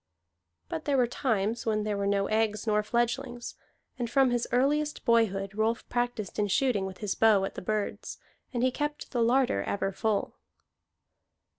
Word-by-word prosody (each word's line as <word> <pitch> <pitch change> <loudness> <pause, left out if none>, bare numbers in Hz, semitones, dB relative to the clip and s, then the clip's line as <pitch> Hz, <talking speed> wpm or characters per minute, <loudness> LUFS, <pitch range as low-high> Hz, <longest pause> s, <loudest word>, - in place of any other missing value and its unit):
But 160 - -5
there 280 -2 +2
were 250 - +4
times 230 -2 -1
when 215 -1 +1
there 210 -1 -1
were 200 0 -1
no 200 0 +2
eggs 215 0 0
nor 210 -1 +2
fledglings, 240 +2 -2 0.5
and 240 -1 -2
from 270 0 +4
his 240 -1 0
earliest 295 +5 +1
boyhood 205 -5 +2
Rolf 220 +2 -1
practised 240 -5 -2
in 205 - +2
shooting 205 -1 +1
with 190 -1 -8
his 210 -3 -1
bow 210 -3 +4
at - - -5
the - - -7
birds, 210 +2 -3 0.3
and 245 -1 -1
he 255 - +3
kept 295 +3 -4
the 240 - 0
larder 240 - +3
ever 195 - -1
full. 215 +1 -1
225 Hz, 170 wpm, -29 LUFS, 205-245 Hz, 0.5 s, were